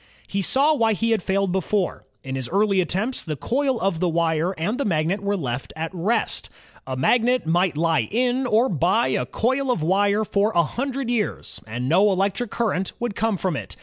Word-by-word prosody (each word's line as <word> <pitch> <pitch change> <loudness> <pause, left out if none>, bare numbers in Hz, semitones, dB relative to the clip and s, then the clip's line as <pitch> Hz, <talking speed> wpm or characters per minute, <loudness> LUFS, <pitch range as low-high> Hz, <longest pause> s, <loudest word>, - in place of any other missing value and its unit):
He 200 - -2
saw 275 - +3
why 225 -6 +2
he 230 +3 0
had 225 - +2
failed 195 0 0
before. 190 +1 -1 0.2
In 130 - -5
his 130 -2 -3
earlier 200 0 +2
attempts, 195 +9 -2
the 155 -3 -4
coil 260 - 0
of 190 -5 -1
wire 165 -1 +1
and 210 - -2
the - - +1
magnet 175 - 0
were 200 0 0
left 125 -5 -4
at 160 +3 -4
rest. 190 +7 -1 0.4
A 130 -1 -3
magnet 245 - +2
might 175 0 +1
lie 160 -7 +1
in 250 +3 +1
or 230 +3 +3
by 170 - +1
a 125 -1 -1
coil 260 +4 0
of 210 -11 0
wire 200 +5 +2
for 205 +2 +1
a 170 - +5
hundred 260 - -3
years, 225 -4 -2
and 120 +3 -4
no 180 +8 +4
elec 195 0 +1
tric 245 -3 -4
current 195 -5 -1
would 240 -4 -3
come 220 -2 0
from 180 -3 -1
it. - - -6
195 Hz, 200 wpm, -23 LUFS, 165-230 Hz, 0.4 s, a